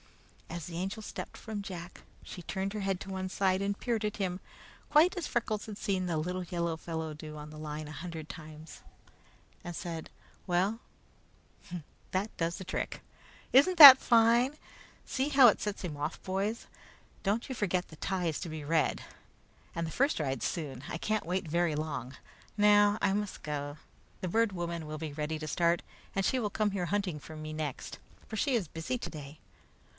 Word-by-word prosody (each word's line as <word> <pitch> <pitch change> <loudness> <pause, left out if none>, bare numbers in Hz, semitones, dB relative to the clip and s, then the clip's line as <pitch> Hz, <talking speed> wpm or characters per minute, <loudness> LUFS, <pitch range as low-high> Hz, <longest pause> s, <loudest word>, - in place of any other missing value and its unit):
As 170 -1 -5
the 170 -1 -6
Angel 195 +5 -3
stepped - - -7
from 215 -2 -5
Jack, 180 -2 -8 0.2
she 180 - -8
turned 195 +3 -3
her 215 - -3
head 195 -2 0
to - - -7
one 190 -1 -3
side 190 0 +1
and 200 0 -1
peered 230 -3 -1
at 210 -1 -2
him, 185 -2 -2 0.5
quite 325 +6 +5
as 355 -4 -3
Freckles 215 -3 -1
had 210 -2 -6
seen 190 -3 -1
the 165 -2 0
little 180 +4 -2
yellow 170 -1 -2
fellow 160 -1 -4
do 155 0 -8
on 150 0 -8
the 155 - -10
line 155 0 -5
a - - -8
hundred 160 0 -6
times, 155 0 -10 0.8
and 175 -1 -6
said: 165 -2 -5 0.4
"Well, 190 +5 +1 1.3
that 195 +4 -1
does 165 0 -1
the - - -6
trick! - - -3 0.5
Isn't 315 +8 +6
that 275 -4 +14
fine? 235 +4 +4 0.5
See 270 +2 -1
how 275 -3 +8
it 215 - +4
sets 210 -1 -3
him 165 -5 -4
off, 145 +2 -4
boys? 200 +5 -2 0.6
Don't 210 +4 0
you 260 - -4
forget 185 -4 0
the 155 - -12
tie 185 +2 -2
is 160 -3 -1
to 170 - -4
be 155 -1 -6
red, 155 +1 +1 0.7
and 170 - -2
the - - -5
first 275 - +2
ride 135 -4 -1
soon. 140 -6 -3
I - - -3
can't 215 +3 -1
wait 185 0 -1
very 170 0 +1
long. 140 -4 -4 0.4
Now 205 0 +6
I 195 - +3
must 210 -1 -3
go. 145 0 -4 0.4
The 185 - -2
Bird 225 +4 +2
Woman 170 -3 -4
will 155 0 -5
be 155 -1 -5
ready 155 +1 -3
to 155 - -5
start, 170 +1 +2 0.3
and 195 -1 +1
she 260 - +2
will 215 -4 -1
come 210 0 0
here 185 -3 -2
hunting 180 -5 -1 0.2
me 155 0 -5
next, 155 -4 -4 0.3
for 220 - -6
she 265 +4 +1
is 205 -8 0
busy 165 +12 -3
today. 150 -9 -8
180 Hz, 190 wpm, -31 LUFS, 155-210 Hz, 1.3 s, that